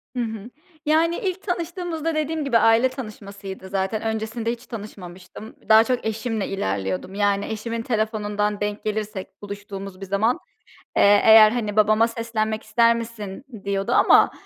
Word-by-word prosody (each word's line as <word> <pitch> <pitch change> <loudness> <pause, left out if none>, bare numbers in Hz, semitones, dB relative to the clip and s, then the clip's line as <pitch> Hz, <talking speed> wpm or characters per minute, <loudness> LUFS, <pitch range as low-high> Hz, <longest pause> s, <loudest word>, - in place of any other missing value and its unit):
Hı 245 - 0
hı, 225 0 -6 0.4
yani, 325 +3 +3
ilk 380 -3 -3
tanıştığımızda 340 -3 -3
dediğim 310 0 -1
gibi, 240 -4 +3
aile 225 +3 +4
tanışmasıydı 200 -6 -8
zaten 195 +3 -1
öncesinde 225 +1 -2
hiç 240 +1 -7
tanışmamıştım. 195 -2 -10
Daha 220 0 +8
çok 250 +1 -2
eşimle 220 -1 -2
ilerliyordum. 95 - -3
Yani, 200 -1 +1
eşimin 225 +1 -4
telefonundan 210 -2 -1
denk 205 0 -3
gelirsek 210 -2 -4
buluştuğumuz 200 -1 -8
bir - - -5
zaman, 210 - +1 0.6
eee, 205 0 +6
eğer, 220 -1 +9
hani, 215 -4 -2
"Babama 215 +1 +4
seslenmek 220 -2 -2
ister 235 0 +3
misin?" 230 0 -7 0.2
diyordu 200 +3 -1
ama, - - +5
220 Hz, 140 wpm, -23 LUFS, 200-235 Hz, 0.6 s, eğer